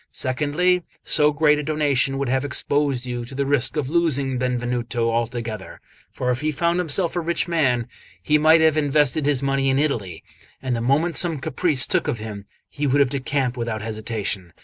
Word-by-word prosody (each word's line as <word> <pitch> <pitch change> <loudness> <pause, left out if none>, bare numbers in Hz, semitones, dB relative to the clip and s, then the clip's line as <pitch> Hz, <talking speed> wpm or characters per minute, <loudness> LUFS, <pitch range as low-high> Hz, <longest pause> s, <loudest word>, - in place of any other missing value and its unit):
Secondly, 150 +7 0 0.2
so 150 0 +3
great 150 0 +3
a - - -3
donation 140 -3 +1
would 140 -1 -2
have 130 +2 0
exposed 140 -2 0
you 120 -1 -4
to 125 +3 -9
the 140 +1 -1
risk 140 0 +1
of 145 -4 -1
losing 140 -5 0
Benvenuto 120 -1 -1
altogether; 115 -3 -4 0.3
for 125 0 -2
if 125 +2 -2
he 155 +1 0
found 170 +4 0
himself 175 +1 -1
a - - +1
rich 170 +1 -1
man, 135 -9 +1 0.4
he 150 +10 +3
might 160 +1 +5
have 160 -1 +3
invested 145 -1 +1
his 140 -2 +1
money 135 0 +1
in 135 - +2
Italy, 115 - -2 0.4
and 130 -2 -2
the 115 - -3
moment 150 +8 +1
some 170 -3 +3
caprice 140 0 +2
took - - 0
of - - -1
him, 105 -2 -8 0.2
he 145 -1 -3
would 140 +2 +2
have 140 -2 +3
decamped 135 -2 -1
without 115 -3 -3
hesitation. 110 -5 -4
135 Hz, 190 wpm, -22 LUFS, 120-150 Hz, 0.4 s, might